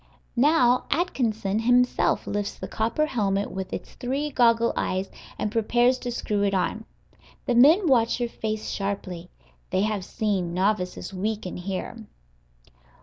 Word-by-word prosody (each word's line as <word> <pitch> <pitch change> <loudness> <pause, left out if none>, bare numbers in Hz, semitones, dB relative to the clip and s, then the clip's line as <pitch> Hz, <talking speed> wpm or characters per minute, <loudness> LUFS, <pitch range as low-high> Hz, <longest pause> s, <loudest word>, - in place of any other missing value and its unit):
Now 250 -2 +4
Atkinson 225 - 0
himself 245 +2 +2
lifts 205 -1 -3
the - - -7
copper 230 +8 0
helmet 205 -7 -1
with 190 0 -5
its - - -6
three 275 +4 -3
goggle 235 -2 +3
eyes, 190 +1 -2 0.3
and 210 - -2
prepares 240 +3 +2
to 245 - -4
screw 210 -3 -2
it 200 -1 +1
on. 220 +4 -1 0.6
The - - +1
men 305 - +6
watch 240 -6 +3
your 240 - 0
face 215 -1 -4
sharply; 185 -3 -4 0.4
they 185 - +1
have 210 -2 -1
seen 190 -5 -2
novices 190 0 -1
weaken 205 0 -3
here. 195 +4 -5
220 Hz, 140 wpm, -25 LUFS, 195-245 Hz, 0.6 s, men